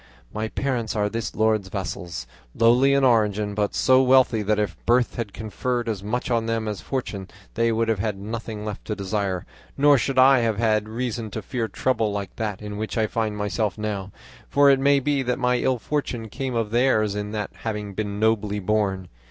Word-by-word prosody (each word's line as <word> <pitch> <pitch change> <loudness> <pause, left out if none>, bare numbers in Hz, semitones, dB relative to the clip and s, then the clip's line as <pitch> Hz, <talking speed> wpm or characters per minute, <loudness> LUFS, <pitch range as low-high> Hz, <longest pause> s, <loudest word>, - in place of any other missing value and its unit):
My 110 +1 -2
parents 120 -2 -2
are 105 -1 +1
this 115 +1 -4
lord's 110 -3 +1
vassals, 90 -2 -5 0.3
lowly 125 +4 +4
in 140 - +2
origin, 105 -4 +2
but 105 0 -1
so 130 0 +5
wealthy 130 -3 +4
that 105 +1 +1
if 105 -5 -1
birth 120 0 +3
had 115 -4 -4
conferred 120 +3 -3
as 105 -4 -2
much 120 +5 -3
on 115 -1 +1
them 115 -1 -1
as 105 -2 -4
fortune, 105 -8 -4 0.3
they 115 +1 +2
would 115 0 +1
have 110 -3 0
had 105 -1 -1
nothing 110 +1 -6
left 105 -2 -5
to 105 - -3
desire, 100 -1 -2 0.3
nor 145 -1 +5
should 135 +3 -2
I 130 0 +7
have 115 -3 0
had 110 -1 +1
reason 115 -1 -3
to 110 +1 -6
fear 120 +1 -2
trouble 110 0 0
like 100 -2 -5
that 105 -2 -3
in 105 -1 -6
which 110 +2 -4
I 110 - +3
find 110 -1 -2
myself 105 +1 -1
now; 100 -2 -4 0.4
for 140 0 +5
it 135 - +3
may 140 +1 +4
be 140 0 0
that 125 -1 -1
my 125 -1 +2
ill 130 0 +1
fortune 120 -4 -3
came 130 +2 -4
of 115 -2 -1
theirs 115 -4 +2
in 105 0 -3
not 105 -1 -4
having 105 -3 -4
been 105 0 -3
nobly 105 -2 +1
born. 100 -2 0
110 Hz, 200 wpm, -24 LUFS, 105-125 Hz, 0.4 s, I